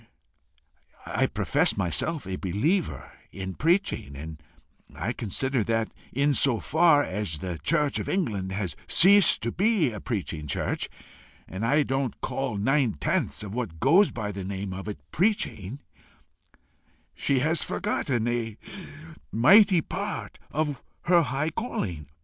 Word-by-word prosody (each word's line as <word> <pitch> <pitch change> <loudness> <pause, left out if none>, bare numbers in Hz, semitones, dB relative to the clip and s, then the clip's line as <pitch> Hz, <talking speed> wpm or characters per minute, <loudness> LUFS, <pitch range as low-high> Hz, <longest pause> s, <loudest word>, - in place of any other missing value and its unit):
I - - 0
profess - - +1
myself 100 - -1
a 95 0 -3
believer 130 - -1 0.2
in 95 -1 -6
preaching, 165 - 0
and 75 +2 -8 0.7
consider 130 +3 -1
that 115 -1 0 0.2
in 140 +2 +2
so 130 -4 +2
far 155 - +4
as 95 - -3
the 85 +1 -5
church 150 -4 +1
of - - -4
England 105 - -1
has 95 -5 -3
ceased 200 - +6
to 115 - -1
be 195 - +2
a 105 - -6
preaching 85 -9 -4
church - - -2 0.6
and 95 +4 -6
I 145 +6 +3
don't 135 -3 -2
call 135 -6 -3
nine 130 +2 +2
tenths 75 - -1
of 100 -1 -7
what 110 -10 -4
goes 175 - +5
by 105 -3 -4
the 100 -1 -6
name 95 0 -4
of 95 +2 -7
it 105 - -4
PREACHING 150 - -1 1.3
she 135 -2 0
has 160 +4 +2
forgotten 120 -4 -1
a 115 -3 -2 0.7
mighty 190 - +6
part 200 +5 -5
of 150 -3 -2 0.2
her 175 -1 +5
high 140 +2 -1
calling. 90 - -4
120 Hz, 135 wpm, -26 LUFS, 95-155 Hz, 1.3 s, ceased